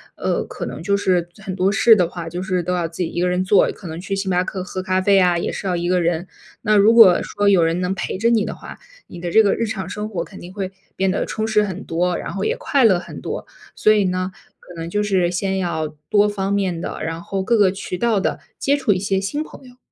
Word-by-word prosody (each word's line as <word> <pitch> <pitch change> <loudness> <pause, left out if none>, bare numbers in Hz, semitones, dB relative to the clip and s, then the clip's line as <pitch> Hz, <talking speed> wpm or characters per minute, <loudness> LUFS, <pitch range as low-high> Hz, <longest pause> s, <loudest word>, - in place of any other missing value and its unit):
呃， - - -1
可 - - -6
能 - - -6
就 200 +3 +1
是 180 -3 +1
很 195 -3 -6
多 190 +1 +2
事 225 +3 +6
的 180 -5 +1
话， 170 -2 -7
就 175 +2 -5
是 185 -1 -1
都 180 +2 -1
要 175 -2 0
自 165 +2 -4
己 165 - -3
1 175 - -3
个 180 - +2
人 180 +1 0
做， 190 +2 +4
可 190 - -11
能 160 +1 -6
去 195 +2 -3
星 195 -1 -2
巴 180 0 +2
克 185 0 -5
喝 185 0 -5
咖 185 0 0
啡 195 +1 +4
啊， 180 -2 +3
也 170 - -2
是 195 - -5
要 180 - 0
1 175 0 -2
个 180 0 +2
人。 170 +1 -1 0.3
那 215 - +2
如 205 +2 +6
果 205 -7 +8
说 205 - -1
有 190 -4 +5
人 165 +2 +1
能 180 +1 0
陪 195 - -4
着 230 +4 +2
你 220 -3 +2
的 - - -5
话， - - -11 0.3
你 175 - -11
的 175 - -3
这 220 +6 +5
个 200 - +3
日 230 - -1
常 190 -3 -4
生 210 +3 -5
活 180 -6 -3
肯 195 - -12
定 175 - -10
会 190 -2 -4 0.2
变 190 0 +1
得 190 - -1
充 220 0 -2
实 215 -1 +3
很 190 -1 -5
多， 175 +1 -1
然 - - -5
后 195 - -3
也 - - 0
快 275 -2 +1
乐 195 -5 +5
很 175 - -8
多。 - - -5 0.3
所 215 - +4
以 210 -2 +2
呢， 185 0 -1 0.3
可 180 - -14
能 165 +1 -5
就 210 +4 0
是 190 -4 +1
先 190 +2 -1
要 160 -4 -1 0.2
多 205 0 +4
方 195 -1 -2
面 190 -4 0
地， - - -5
然 165 +1 -4
后 195 +2 -3
各 235 +4 +2
个 200 -3 +4
渠 195 -1 -5
道 230 0 +1
地 - - -1 0.2
接 280 - +2
触 270 -7 +1
一 185 - +2
些 195 0 0
新 290 +11 -2
朋 270 - -13
友。 250 0 -17
190 Hz, 290 characters per minute, -20 LUFS, 180-205 Hz, 0.3 s, 果